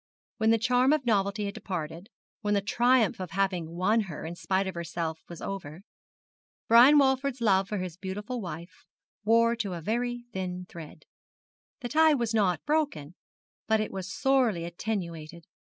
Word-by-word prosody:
When 220 0 +3
the 225 - +5
charm 250 +4 +3
of 300 -4 0
novelty 205 -2 +1
had 200 - -4
departed, 175 +1 -6 0.3
when 210 -1 +1
the 200 - +2
triumph 240 +1 +2
of 185 -2 -5
having 180 -3 -1
won 200 +6 +2
her 160 - -6
in 165 - -5
spite 190 +2 -1
of 190 - -4
herself 170 -1 -4
was 170 - -9
over, 180 -3 -6 0.8
Brian 245 +6 +8
Walford's 265 -1 +2
love 195 -4 +3
for 210 - -2
his 180 -3 -5
beautiful 205 +6 -5
wife 170 -1 -9 0.4
wore 230 +1 +4
to 205 -5 -3
a 170 - -5
very 240 +5 -2
thin 180 -1 -4
thread. 165 -4 -11 0.8
The 245 - -4
tie 315 +1 +5
was 235 -4 -1
not 195 -5 +1
broken, 290 - -1 0.5
but 220 -1 +3
it 215 - -2
was 190 0 -5
sorely 245 -11 +1
attenuated. 170 -3 -5
200 Hz, 165 wpm, -28 LUFS, 175-235 Hz, 0.8 s, Brian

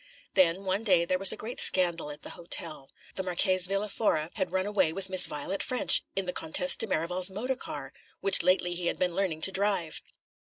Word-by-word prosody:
Then, 185 0 +2
one 195 +3 -2
day, 180 -6 +2
there 185 +1 -2
was 195 0 +5
a - - -7
great 235 +3 -4
scandal 170 -4 +3
at 150 0 -10
the - - -8
hotel. 160 -4 -4 0.2
The - - -3
Marchese 185 0 +2
Villa 195 +2 -2
Fora 170 -7 -2
had 190 -4 -4
run 190 0 -2
away 195 -5 0
with 190 +2 -4
Miss 185 -1 +5
Violet 150 +7 -5
Ffrench, 255 -1 +3
in 195 - -3
the 180 - -5
Comtesse 170 +3 +2
de - - -2
Merival's 180 +4 +1
motor 235 +7 -4
car, 140 - -9 0.3
which 195 0 +3
lately 180 0 +1
he 175 0 -4
had - - -2
been 180 -1 -2
learning 170 -4 -3
to 195 - +2
drive. 190 -5 -2
185 Hz, 215 wpm, -27 LUFS, 170-195 Hz, 0.3 s, was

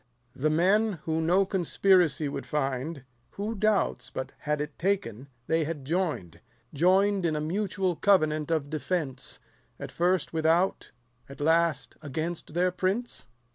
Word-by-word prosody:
The 155 +4 +1
men, 195 +7 +3
who 160 0 -1
no 180 +4 +3
conspiracy 180 -5 +2
would 140 - -5
find, 140 0 -2 0.3
Who 210 +3 -3
doubts, 215 -1 0
but 130 - -5
had 150 0 -1
it 150 0 -5
taken, 140 - -1 0.2
they 160 +3 +1
had 150 -3 -5
join'd, 155 - -2 0.3
210 - - -8
Join'd 190 +2 +3
in 155 - -1
a - - -1
mutual 185 +2 -1
covenant 155 -6 +2
of 155 -3 -1
defence; 145 -3 -3 0.4
At - - -7
first 175 -2 0
without, 165 +4 +1 0.4
at 140 - -11
last 165 +2 +1
against 160 +2 -4
their 180 +1 +2
prince 190 +7 -2
165 Hz, 140 wpm, -28 LUFS, 150-185 Hz, 0.4 s, men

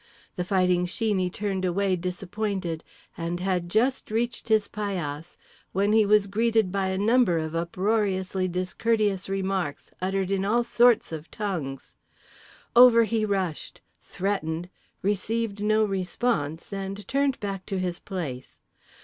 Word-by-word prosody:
The 180 - -1
Fighting 180 -1 +2
Sheeney 190 -2 0
turned 195 -1 -2
away 185 +1 +1
disappointed, 180 -1 -3 0.3
and 170 +1 -3
had 180 -2 -1
just 245 +7 +1
reached 235 +1 -2
his 215 -2 +3
paillasse 175 -7 -4 0.4
when 200 +3 +2
he 220 -2 +5
was 210 -1 +5
greeted 220 0 +1
by 195 0 0
a 190 0 -1
number 210 -3 +3
of 160 0 -3
uproariously 190 +1 0
discourteous 195 +2 0
remarks 190 -5 -2
uttered 190 0 -1
in 195 -1 +1
all 230 +4 +2
sorts 240 -3 +4
of 160 0 -6
tongues. 160 -11 -4 0.8
Over 235 -1 +8
he 220 0 0
rushed, 190 -6 -3 0.2
threatened, 180 -3 -3 0.3
received 205 +1 -1
no 215 +1 +3
response, 190 -4 -1
and 195 +1 -5
turned 275 -1 +1
back 195 -3 -5
to 195 - -2
his 180 -2 -2
place. 150 -11 -6
195 Hz, 130 wpm, -26 LUFS, 180-215 Hz, 0.8 s, Over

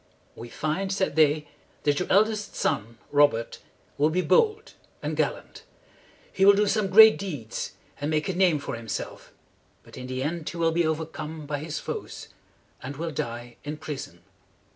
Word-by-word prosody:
"We 120 - -9
find," 160 +9 -2
said 190 -6 0
they, 150 -1 +3 0.4
"that 145 -1 +2
your 180 - -3
eldest 210 +1 +2
son, 115 +3 -1
Robert, 145 -6 +2 0.4
will 150 +2 +4
be 180 +3 0
bold 440 - +2 0.3
and - - -2
gallant. - - -2 0.7
He 190 - +1
will 200 +1 +8
do 210 +1 +3
some 205 -1 +1
great 220 +3 +8
deeds, 145 - -5 0.3
and 145 +1 -2
make 155 -1 0
a 190 - -1
name 180 -3 +3
for 140 - -5
himself; 115 -3 -6 0.5
but - - -14
in 125 - -7
the 130 0 -3
end 160 +2 -3
he 170 - -8
will 165 -1 +2
be 165 0 +1
over 160 0 -1
come 155 0 -7
by 145 0 -3
his 155 +1 -5
foes, - - -6 0.5
and 135 +2 -7
will 165 +1 -3
die 120 -3 -5
in 150 +1 -5
prison. 150 -2 -7
155 Hz, 175 wpm, -26 LUFS, 145-190 Hz, 0.7 s, will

